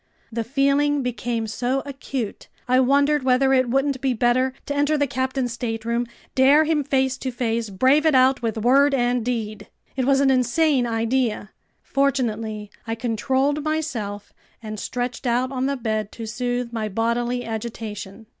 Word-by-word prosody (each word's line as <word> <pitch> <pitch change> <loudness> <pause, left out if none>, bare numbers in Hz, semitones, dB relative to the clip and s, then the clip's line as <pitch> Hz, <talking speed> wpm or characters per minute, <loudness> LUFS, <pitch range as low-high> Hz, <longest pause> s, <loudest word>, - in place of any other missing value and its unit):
The 230 0 -2
feeling 280 +3 +2
became 240 -2 -2
so 245 +5 -1
acute, 270 -5 -5 0.2
I 255 +1 +4
wondered 280 +3 +3
whether 265 +1 +3
it 255 -2 +3
wouldn't 270 +1 0
be 265 -2 +1
better 245 +3 +2
to 285 - -3
enter 290 +2 +2
the 290 - +2
captain's 260 -1 -2
stateroom, 235 0 -2 0.3
dare 275 +4 +5
him 310 -2 +1
face 265 -1 0
to 260 - -3
face, 235 -2 -2
brave 260 +11 +3
it 305 - +4
out 260 +1 +4
with 225 -2 -2
word 275 +5 +4
and 245 -1 +1
deed! 215 -4 -3 0.3
It 260 -2 0
was 270 0 +3
an 275 -1 +4
insane 255 +1 +2
idea. 230 -2 -1 0.3
Fortunately 225 -6 -1 0.2
I 225 - -1
controlled 260 +5 0
myself 265 -11 -3 0.3
and 215 -2 -7
stretched 245 +3 -3
out 250 +2 +1
on 260 0 -1
the 280 0 -1
bed 215 -3 -2
to 230 - -7
soothe 245 +1 -3
my 220 -2 -2
bodily 235 +3 -1
agitation. 220 -2 -6
250 Hz, 160 wpm, -23 LUFS, 230-270 Hz, 0.3 s, dare